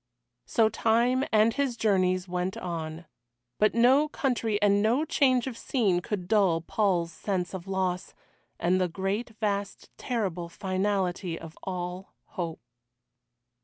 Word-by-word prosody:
So 225 -1 +3
time, 240 +5 +2
and 220 +1 +4
his 275 -4 -1
journeys, 185 -4 +2
went 180 +1 -2
on. 165 -1 -5 0.5
But 215 +1 +3
no 260 +6 +5
country 235 -7 -1
and 205 -1 +3
no 240 +8 +2
change 260 -5 +3
of 260 -3 -4
scene 210 -8 +1
could 180 -1 -4
dull 195 -6 +3
Paul's 175 -2 0
sense 185 -2 -3
of 185 0 -6
loss, 185 -1 -2 0.4
and 180 +2 +2
the 180 - +2
great 200 +6 -3
vast 200 -2 -2
terrible 185 -8 -2
finality 185 -2 -1
of 165 -1 -10
all 180 0 -5
hope. 170 -3 -5
195 Hz, 130 wpm, -28 LUFS, 180-225 Hz, 0.5 s, no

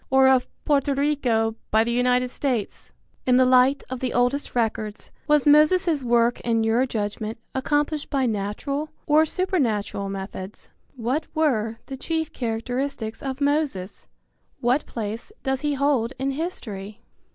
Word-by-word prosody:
Or 265 0 +5
of 260 -1 +4 0.2
Porto 280 -1 +2
Rico 250 -6 +1
by 220 +1 +4
the 235 - -2
United 250 +1 +2
States? 250 -8 -3 0.4
In 250 0 +5
the 255 - +5
light 255 +2 +4
of 260 -1 -5
the 255 -1 -2
oldest 245 +4 +1
records, 225 -2 -2 0.2
was 300 -2 +4
Moses' 305 +1 +5
work 240 -1 +2
in 230 -1 +1
your 230 +4 +2
judgment 215 0 -3 0.2
accomplished 290 +2 0
by 275 -2 +1
natural 230 +8 -2 0.2
or 310 +1 +4
supernatural 235 - -1
methods? 195 0 -7 0.2
What 255 +6 -2
were 230 -8 +1
the 270 - -7
chief 320 +2 -2
characteristics 235 0 -3
of 270 0 -4
Moses? 285 -10 -1 0.5
What 250 +5 +1
place 225 - -5
does 265 -1 -1
he 295 -1 0
hold 270 -4 +1
in 270 +1 -1
history? 220 - -5
255 Hz, 140 wpm, -24 LUFS, 225-285 Hz, 0.5 s, Or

